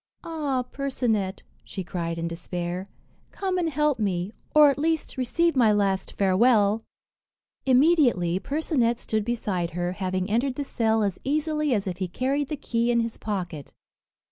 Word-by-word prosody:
"Ah! 290 Hz, -6 st, -1 dB
Percinet," 245 Hz, -7 st, -2 dB, 0.2 s
she 190 Hz, -, -6 dB
cried 170 Hz, -2 st, -3 dB
in 165 Hz, 0 st, -2 dB
despair, 175 Hz, +2 st, -4 dB, 0.4 s
"come 375 Hz, -2 st, -2 dB
and 335 Hz, -2 st, 0 dB
help 300 Hz, -3 st, +1 dB
me, 190 Hz, -2 st, -1 dB, 0.2 s
or 300 Hz, -1 st, +8 dB
at 275 Hz, -, -4 dB
least 320 Hz, +1 st, -1 dB
receive 325 Hz, +6 st, +1 dB
my 235 Hz, -5 st, +5 dB
last 200 Hz, -2 st, 0 dB
farewell." 205 Hz, +2 st, +3 dB, 0.8 s
Immediately 255 Hz, -, +4 dB
Percinet 270 Hz, -, 0 dB
stood 220 Hz, -2 st, -1 dB
beside 200 Hz, -7 st, -2 dB
her, 175 Hz, 0 st, -1 dB
having 185 Hz, 0 st, -2 dB
entered 245 Hz, +5 st, 0 dB
the 285 Hz, -, -2 dB
cell 225 Hz, -5 st, +1 dB
as 200 Hz, -3 st, -1 dB
easily 305 Hz, +1 st, 0 dB
as 200 Hz, -, -1 dB
if 180 Hz, -2 st, -3 dB
he 185 Hz, -1 st, -2 dB
carried 270 Hz, +9 st, -1 dB
the 300 Hz, 0 st, -4 dB
key 235 Hz, -2 st, -1 dB
in 235 Hz, -1 st, +3 dB
his 230 Hz, -1 st, -4 dB
pocket. 175 Hz, -9 st, -4 dB
230 Hz, 155 wpm, -25 LUFS, 190-280 Hz, 0.8 s, or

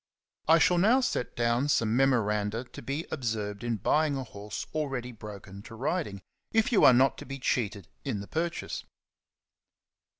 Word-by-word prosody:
I 165 Hz, +1 st, +7 dB
SHALL 175 Hz, +2 st, +4 dB
now 225 Hz, +8 st, +5 dB
set 245 Hz, -, -1 dB
down 120 Hz, +3 st, +1 dB
some 115 Hz, -5 st, +2 dB
memoranda 115 Hz, -4 st, +2 dB
to 125 Hz, -, -11 dB
be 140 Hz, +7 st, -3 dB
observed 110 Hz, -6 st, -3 dB
in 120 Hz, -1 st, 0 dB
buying 150 Hz, +8 st, +2 dB
a 135 Hz, -, -3 dB
horse 105 Hz, -3 st, -7 dB
already 135 Hz, -5 st, -2 dB
broken 100 Hz, -3 st, -10 dB
to 115 Hz, +2 st, -11 dB
riding, 125 Hz, -, -2 dB, 0.3 s
if 225 Hz, +1 st, +2 dB
you 225 Hz, -, +4 dB
are -, -, +10 dB
not 130 Hz, +1 st, +3 dB
to -, -, -8 dB
be 135 Hz, +1 st, -5 dB
cheated 105 Hz, -8 st, -1 dB, 0.2 s
in 105 Hz, -, -2 dB
the 100 Hz, -, -7 dB
purchase. 165 Hz, +1 st, -3 dB
120 Hz, 165 wpm, -29 LUFS, 105-145 Hz, 0.3 s, are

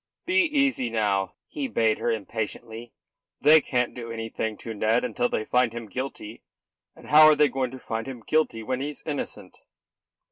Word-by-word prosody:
"Be 380 Hz, +2 st, +3 dB
easy 275 Hz, -, +1 dB
now," 100 Hz, -4 st, 0 dB
he 290 Hz, -4 st, -4 dB
bade 115 Hz, -, +1 dB
her -, -, -1 dB
impatiently. 110 Hz, +2 st, -4 dB, 0.5 s
"They 155 Hz, +2 st, +7 dB
can't 125 Hz, -3 st, -1 dB
do 115 Hz, -2 st, -7 dB
anything 115 Hz, -1 st, -4 dB
to 115 Hz, -, -7 dB
Ned 110 Hz, +3 st, +1 dB
until 120 Hz, -1 st, -1 dB
they 110 Hz, -, -2 dB
find 125 Hz, -1 st, +2 dB
him 120 Hz, -1 st, -6 dB
guilty; 115 Hz, -1 st, -6 dB, 0.5 s
and -, -, -14 dB
how 155 Hz, +1 st, +9 dB
are 155 Hz, -, +6 dB
they 150 Hz, 0 st, +4 dB
going 130 Hz, 0 st, -1 dB
to 130 Hz, -, -9 dB
find 115 Hz, -2 st, -5 dB
him 125 Hz, -4 st, -8 dB
guilty 155 Hz, -8 st, +1 dB
when 130 Hz, +3 st, -2 dB
he's 145 Hz, +1 st, -6 dB
innocent?" 145 Hz, -3 st, -5 dB
120 Hz, 175 wpm, -26 LUFS, 110-145 Hz, 0.5 s, how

